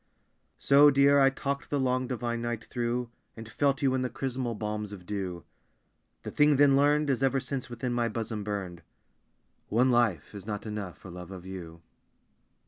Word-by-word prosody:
So, 145 +1 +6
Dear, 140 0 +5
I 135 0 +6
talked 140 +1 -4
the 145 - 0
long, 130 -1 0
divine 120 -2 -3
night 120 -1 -3
through, 120 0 -2 0.3
And 110 0 -8
felt 140 +4 0
you 135 -1 +3
in 130 - 0
the 125 - -1
chrismal 125 -4 -3
balms 105 0 -4
of 95 -3 -10
dew. 95 -4 -4 0.8
The - - -6
thing 150 0 +4
then 140 0 +5
learned 145 +2 +3
Has 130 -2 0
ever 135 0 +2
since 135 -1 -5
within 120 +1 -3
my 120 -1 +1
bosom 110 -1 -4
burned 100 -4 -5 0.9
One 125 +4 +3
life 115 - +1
is 100 0 -9
not 105 0 -4
enough 105 -4 -5
for 95 - -12
love 90 0 -9
of 95 -2 -9
you. 85 -3 -9
120 Hz, 180 wpm, -28 LUFS, 105-135 Hz, 0.9 s, So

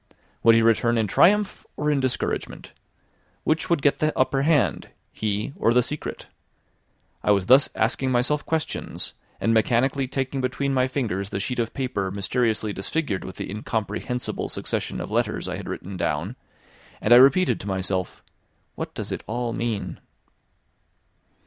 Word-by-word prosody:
Would 115 0 +6
he 115 - +4
return 115 +1 +3
in 110 - +2
triumph 200 - +3
or 150 0 +1
in 145 - +2
discouragement? 130 -2 -2 0.7
Which 155 0 0
would 170 -5 +1
get 145 - +3
the 155 0 +2
upper 135 +1 +2
hand, 140 - +2 0.2
he 105 +5 -2
or 115 - +2
the 125 - +5
secret? 150 +5 -5 1.0
I - - -1
was 100 -2 +3
thus 130 +6 +6
asking 130 +4 +1
myself 130 +4 +1
questions, 160 -1 -3 0.3
and 115 - +2
mechanically 125 +5 +2
taking 135 +1 -2
between 135 +2 -1
my 130 -1 +2
fingers 110 -8 -2
the 100 - -3
sheet 125 +5 -3
of 115 -1 -2
paper 125 -8 -2
mysteriously 110 +2 0
disfigured 100 - -2
with 95 - -8
the - - -5
incomprehensible 110 +3 -3
succession - - -3
of - - -6
letters - - 0
I - - -3
had - - -7
written 95 0 -6
down; 90 +8 -2 0.6
and 115 - +4
I - - +10
repeated 140 +8 +5
to 100 - -8
myself 95 -1 -2 0.5
"What - - -6
does - - -5
it - - -4
all 120 +1 -2
mean?" 115 -3 -3
120 Hz, 155 wpm, -24 LUFS, 105-135 Hz, 1.0 s, I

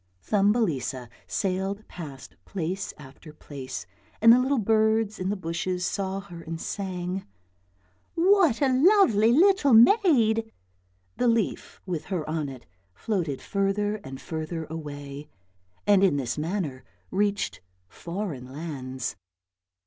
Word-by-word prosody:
Thumbelisa 185 - +1 0.2
sailed 195 +2 -2
past 145 -6 -9
place 185 +1 -3
after 150 +2 -13
place, 135 - -7 0.3
and 230 +1 +8
the 245 - +5
little 265 +2 +1
birds 220 0 +2
in 185 +1 -1
the 205 - 0
bushes 180 0 -2
saw 195 0 -2
her 175 -4 -10
and 165 0 -6
sang, 185 -1 -4 0.5
" 90 0 -40
what 345 - +4
a 270 - +4
lovely 255 - +5
little 325 -1 +5
maid." 230 - +5 0.7
The 245 - +2
leaf 230 -3 0
with 170 -4 -3
her 175 -6 -3
on 155 -2 -2
it 130 -3 -10 0.3
floated 170 - -2
further 205 +1 0
and 135 -9 -9
further 160 0 -4
away 145 -2 -7 0.6
and 200 -1 +5
in 180 -7 +4
this 130 -3 -2
manner 155 -4 -3 0.3
reached 205 - 0 0.3
foreign 170 - -6
lands. 130 -4 -5
185 Hz, 125 wpm, -26 LUFS, 150-220 Hz, 0.7 s, and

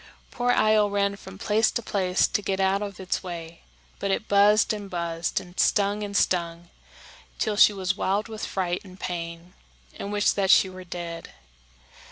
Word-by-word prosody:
Poor 245 0 -1
Io 215 -3 +4
ran 200 0 0
from 190 -1 -12
place 215 +2 +2
to 235 - -3
place 185 -3 +1
to - - -1
get 195 -1 -2
out 195 +1 +2
of 200 -2 -6
its 185 -1 -2
way; 170 -2 -8 0.4
but 200 - -2
it 215 +3 -1
buzzed 205 +2 +4
and 205 -2 -6
buzzed, 170 -1 -2
and 180 -1 -12
stung 205 0 +2
and 205 -1 -2
stung, 170 -1 0 0.7
till 215 - -1
she 210 - +7
was 190 -2 -2
wild 205 +2 0
with 220 -1 -7
fright 180 -2 -2
and 185 -1 -14
pain, 170 0 -6 0.4
and 200 - -6
wished 205 0 +2
that 195 -2 0
she 190 - +6
were 185 0 -9
dead. 170 -1 -7
195 Hz, 180 wpm, -25 LUFS, 180-205 Hz, 0.7 s, she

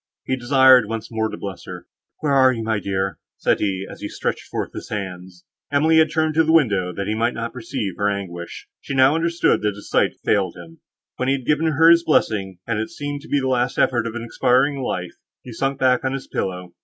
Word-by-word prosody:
He 130 - 0
desired 130 -2 +5
once 115 +1 -5
more 110 -1 -1
to - - -7
bless 100 -3 -7
her; - - -9 0.4
"Where 145 -2 +1
are 130 -1 +5
you, 115 -3 -4
my 110 -2 0
dear?" 95 -1 -2 0.2
said - - +1
he, 95 -2 -1
as - - -11
he - - -4
stretched - - -4
forth - - -4
his - - -8
hands. 90 -3 -7 0.3
Emily 155 +3 +3
had 160 -1 +4
turned 155 0 0
to 160 +1 +4
the 160 - +1
window, 105 - +3
that 100 +2 -4
he 105 - -1
might 115 +2 0
not 115 0 -4
perceive 115 -5 -4
her 100 0 +1
anguish; 90 -4 -6
she 140 - -6
now 130 +2 +5
understood, 170 +1 +1
that 105 -1 -1
his 105 - -12
sight - - +2
had - - -36
failed 100 -3 +1
him. 85 -1 -13 0.4
When 130 - -2
he 135 - +3
had 130 -3 -7
given 150 +2 +2
her 160 +1 +4
his 170 0 +5
blessing, 100 - +1
and 115 -2 -1
it 110 - -3
seemed 145 0 -5
to 155 - -13
be 145 - +2
the 130 - -2
last 125 -1 0
effort 120 -3 +2
of 115 - -6
expiring 130 +4 +1
life, 90 -8 -3 0.3
he 125 - -9
sunk 135 +4 -1
back 130 -2 +2
on 130 0 -1
his 135 -1 -5
pillow. 90 -1 -4
120 Hz, 235 wpm, -21 LUFS, 100-140 Hz, 0.4 s, desired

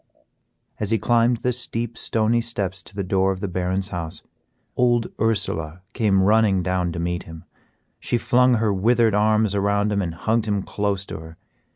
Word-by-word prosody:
As 105 - -2
he 115 - +3
climbed 120 +2 +2
the 125 +2 -1
steep, 120 -1 0
stony 115 +1 +1
steps 100 -5 -3
to 100 - -16
the 100 - -2
door 95 +1 +1
of 95 - -4
the 100 - -3
Baron's 95 +1 -2
house, 85 -4 -6 0.5
old 120 -2 +1
Ursela 90 -7 -1
came 100 -5 +2
running 105 -2 +3
down 90 -1 -1
to 85 - -5
meet 85 +1 -3
him. 80 -1 -10 0.6
She 120 - -1
flung 125 +1 +3
her 110 -2 +1
withered 115 +3 +2
arms 105 0 +2
around 100 +1 +1
him 100 -1 0
and 85 -3 -4
hugged 110 +5 0
him 100 -2 0
close 100 -2 -2
to - - -7
her. 80 0 -12
100 Hz, 180 wpm, -22 LUFS, 95-115 Hz, 0.6 s, he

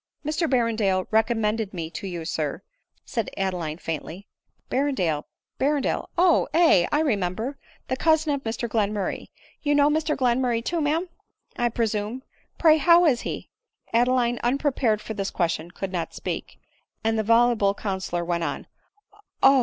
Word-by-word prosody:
' - - -41
"Mr 310 +2 0
Berrendale 220 -7 +1
recommended 220 -2 +1
me 165 -2 -3
to 195 - -6
you, 170 -3 -5
sir," 155 -4 -3 0.4
said 230 -4 -2
Adeline 180 -5 -2
faintly. 165 +3 -6 0.2
" - - -42
Berrendale, 195 - 0 0.3
Berrendale, 285 0 0
O, 350 -1 +4
aye— 320 - +5
I 295 - +3
remember 220 - -1
— - - -31
the 260 - 0
cousin 315 +1 +2
of 280 - -2
Mr 230 0 -3
Glenmurray; 210 -3 -1 0.3
you 290 -1 +1
know 290 +1 +4
Mr 310 0 0
Glenmurray 245 -2 +1
too, 335 -1 0
ma'am, 315 +5 0 0.5
I 240 0 +1
presume; 225 +2 -2 0.3
pray 315 -2 +6
how 345 +2 +6
is 255 -7 +3
he - - -6 0.2
?" - - -34
Adeline 245 0 +2
un 245 +3 +1
prepared 255 -7 +1
for 220 - -6
this 200 -2 -2
question, 170 -1 -1
could 185 +1 -5
not 175 -3 -3
speak; - - -5 0.5
and 225 0 +1
the 220 - +1
vol 235 +2 +4
uble 200 -2 +1
counsellor 190 -4 -3
went 170 -1 -1
on - - -3 0.3
— 415 0 -41
" - - -31
Oh 270 0 +7
230 Hz, 170 wpm, -25 LUFS, 195-280 Hz, 0.5 s, Oh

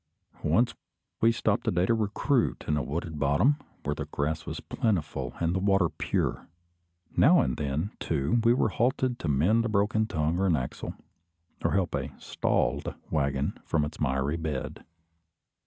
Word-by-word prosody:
Once 105 +11 +2 0.5
we 115 - +6
stopped 110 -3 0
a - - +4
day 90 +1 +2
to 115 - +3
recruit 115 +4 0
in 75 - +2
a 75 - 0
wooded 75 +3 -4
bottom, 80 - +3 0.3
where 75 - 0
the - - -4
grass 75 +2 -2
was - - -4
plentiful 75 - -2
and 85 0 +1
the 95 - 0
water 95 -3 +3
pure. - - -2 0.7
Now - - +6
and 65 - 0
then, 75 +8 -2
too, 80 - +1
we 115 - +5
were 110 - +2
halted 125 +3 0
to - - -4
mend 85 +12 +3
a - - 0
broken 110 +1 +2
tongue 80 +1 0
or 95 - +2
an 85 - +4
axle, 65 -3 -4 0.7
or - - +1
help 95 -3 +1
a - - -4
"stalled" - - 0 0.2
waggon 70 -2 0
from 75 -3 +1
its 75 - -8
miry 70 +2 0
bed. 80 -5 -4
85 Hz, 170 wpm, -28 LUFS, 75-110 Hz, 0.7 s, we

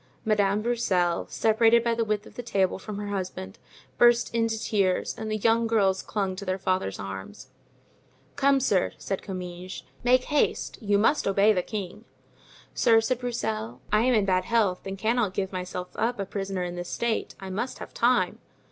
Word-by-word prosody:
Madame 210 -1 +2
Broussel, 190 -8 +1
separated 225 +1 +4
by 235 -1 +1
the 230 0 0
width 215 -1 -1
of - - -14
the - - -6
table 195 -6 0
from 205 +1 -7
her 205 0 -4
husband, 185 - -5 0.4
burst 240 0 +5
into 225 -1 0
tears, 195 -4 0
and 220 0 -5
the 215 - -1
young 230 +2 +2
girls 195 -4 +2
clung 195 -3 -2
to 195 - -7
their 185 -1 -1
father's 185 - -1
arms. 95 0 -8 0.9
"Come, 275 -1 +3
sir," 205 -8 +1
said 195 - -4
Comminges, 180 -1 -7 0.2
"make 250 +1 +4
haste; 295 +2 0
you 205 -2 +2
must 225 +6 +2
obey 200 +2 +4
the 180 - +1
king." 210 +2 -6 0.7
"Sir," 225 -2 +5
said 235 +2 -1
Broussel, 120 - -3
"I 210 +1 +4
am 250 +1 +3
in 210 -2 +3
bad 185 -1 +1
health 205 -5 +1
and 195 0 -4
cannot 220 -2 0
give 190 -1 -1
myself 180 0 -4
up 230 +1 -1
a 195 - -1
prisoner 195 -1 -3
in 175 0 -4
this 175 0 -5
state; 235 -1 -2
I 190 -1 -7
must 230 +7 -3
have - - -9
time." 245 +1 +2
205 Hz, 185 wpm, -26 LUFS, 185-230 Hz, 0.9 s, burst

